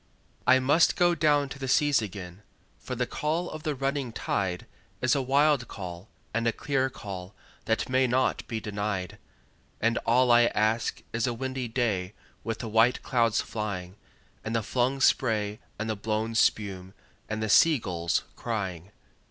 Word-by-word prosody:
I 130 +1 +7
must 145 +6 +4
down 175 -1 +4
go 145 -1 +4
to 140 0 -9
the 135 - -4
seas 145 -1 +3
again, 95 -2 -7 0.4
for 125 - -5
the 125 +1 0
call 160 +7 -2
of 155 - -7
the 150 -1 -2
running 135 -1 -2
tide 95 -4 -2 0.3
Is 130 - +2
a 140 - +2
wild 140 -1 +3
call 90 0 -8 0.2
and 115 +1 0
a - - +4
clear 135 +1 0
call 95 -5 -8 0.3
that 110 - 0
may 130 0 +2
not 130 +2 0
be 115 -3 -3
denied; 100 -3 -3 0.6
And 115 +1 +1
all 125 +2 +3
I 120 0 +7
ask 110 +2 0
is 120 +2 0
a 120 - -1
windy 130 0 -3
day 105 -5 -1 0.3
with 115 0 -3
the 115 - -5
white 115 +3 +3
clouds 115 -3 +2
flying, 100 -4 -5 0.5
And 110 +1 -3
the 115 - +1
flung 130 +4 0
spray 110 -5 +2 0.2
and 110 - -3
the 110 - -1
blown 110 +2 -2
spume, 95 -4 0 0.3
and 110 0 -2
the - - 0
sea 155 +8 +6
gulls 85 -6 -1
crying. 95 -6 -4
115 Hz, 170 wpm, -27 LUFS, 105-130 Hz, 0.6 s, I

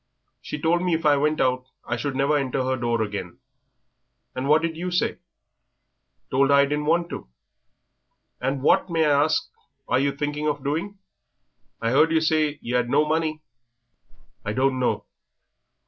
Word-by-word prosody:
"She 150 - -6
told 170 +3 +2
me 180 -2 +1
if 160 - -4
I 150 -1 +6
went 150 +2 +1
out, 130 0 +1 0.2
I 120 - -2
should 135 +3 -3
never 140 +3 +2
enter 135 -2 0
her 130 0 0
door 120 -2 0
again." 100 -4 -6 1.0
"And 130 +1 -3
what 155 +2 +5
did 165 -1 -1
you 175 +3 -3
say?" 180 0 0 1.1
"Told 135 +1 +3
her 140 - +6
I 140 - +6
didn't 150 +1 -2
want 170 +2 +2
to." - - -7 1.1
"And 135 0 -1
what, 170 - +3
may 165 -2 +2
I 145 -1 +4
ask, 155 - 0 0.4
are 125 - +2
yer 140 0 +1
thinking 150 +1 -2
of 145 -2 -2
doing? 170 +8 -2 0.8
I 115 0 -1
'eard 155 +5 +4
yer 160 - +4
say 155 -2 +1
yer 125 +1 +1
'ad 120 0 -2
no 145 +3 +3
money." 155 0 -1 1.0
"I 105 - -3
don't 130 +2 +1
know." 125 - 0
145 Hz, 175 wpm, -24 LUFS, 130-155 Hz, 1.1 s, I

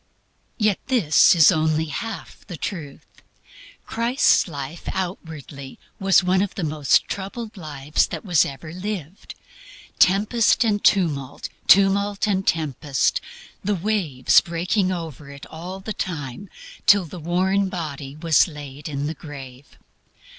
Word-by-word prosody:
Yet 210 -4 +1
this 205 - +5
is 160 -1 +7
only 155 -1 +1
half 210 +8 -6
the 175 -4 -7
truth. 150 -8 -6 0.8
Christ's 235 +2 +2
life 145 0 -7
outwardly 160 -7 -6 0.2
was 195 -1 +4
one 185 +1 +2
of 195 -3 -2
the 195 - -3
most 150 -2 +2
troubled 210 +3 -6
lives 150 -4 -1
that - - -7
was 175 -8 +4
ever 155 +4 -7
lived: 185 -2 -6 0.6
tempest 210 +5 +4
and 210 -3 0
tumult, 150 -9 +1 0.2
tumult 200 +1 +4
and 195 -2 0
tempest, 145 -3 0 0.4
the 205 +1 0
waves 175 -9 +2
breaking 185 +3 -1
over 160 -5 -6
it 140 0 -10
all 180 +4 -7
the 210 +3 -5
time 160 -1 -5 0.4
till 200 -2 +6
the 170 +3 -9
worn 190 +4 +1
body 145 -6 -6
was 160 +1 +3
laid 145 -2 -9
in 140 -1 -3
the 155 - -2
grave. 140 -4 -11
170 Hz, 130 wpm, -22 LUFS, 150-195 Hz, 0.8 s, is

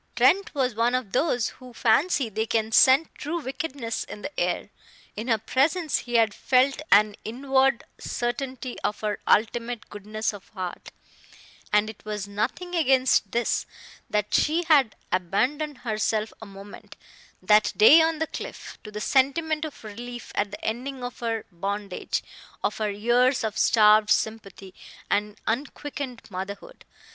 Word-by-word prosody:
Trent 335 - +3
was 260 -3 +1
one 230 +3 +1
of 250 -6 -3
those 245 - +1
who 250 -1 -12
fancy 265 +4 +2
they 220 +1 -2
can 220 -1 0
scent 265 +7 +5
true 325 +4 -4
wickedness 265 -4 -4
in 210 - -10
the 295 - -5
air. - - -1 0.4
In 220 +4 -5
her 225 -3 +3
presence 295 - +1
he 240 -1 -6
had 225 -3 +4
felt 265 +5 +2
an 210 0 +5
inward 265 +2 +1 0.2
certainty 250 +1 -4
of 210 - -2
her 210 -1 -2
ultimate 230 +2 +1
goodness 215 +2 -3
of 200 -2 -12
heart; 185 -2 -6 0.8
and 210 +1 +3
it 220 -1 -10
was 210 -2 -4
nothing 230 - -3
against 260 - +3
this, 235 0 0 0.4
that 210 0 -1
she 325 +3 +2
had 290 -9 +4 0.2
abandoned 255 - 0
herself 215 -2 -1
a 220 - -8
moment, 195 +1 -12 0.4
that 210 +3 +4
day 295 +10 +8
on 320 0 +1
the 320 - 0
cliff, - - -8
to 210 - -9
the 210 0 -6
sentiment 300 +6 +1
of 300 - -9
relief 240 +3 -8
at 205 0 0
the 205 +1 -9
ending 255 +4 -3
of 245 - -6
her 225 -2 -2
bondage, 195 +2 -3 0.4
of - - -1
her 215 -1 0
years 240 +6 +2
of 220 -1 -2
starved 215 -1 +5
sympathy 205 -3 -1 0.4
and 210 +1 0
unquickened 275 0 -4
motherhood. 200 - -7
235 Hz, 150 wpm, -25 LUFS, 210-270 Hz, 0.8 s, day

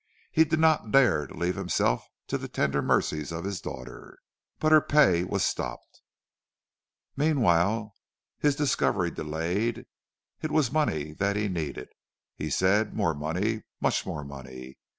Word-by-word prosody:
He 160 - +5
did 160 +1 0
not 160 -7 +3
dare 120 - +4
to - - -12
leave 90 +1 0
himself - - 0 0.2
to - - -2
the - - -6
tender - - 0
mercies 75 +1 0
of 85 0 -4
his 100 -3 -4
daughters. 65 0 -9 0.4
But 155 - +1
her 155 -1 +8
pay 95 - +4
was 90 - 0
stopped. - - -4 1.1
"Meanwhile 110 - +2 0.5
his 145 -1 +2
discovery 145 -2 +1
delayed. 85 +9 -2 0.6
It 155 - -2
was 150 -4 +1
money 80 - 0
that 100 +4 0
he 105 0 0
needed, 80 -8 -4 0.5
he 75 - -4
said, 100 +7 +2
more 80 - +1
money, 90 +10 -2 0.2
much - - +1
more 75 - -5
money. 65 -2 -10
95 Hz, 145 wpm, -27 LUFS, -, 1.1 s, her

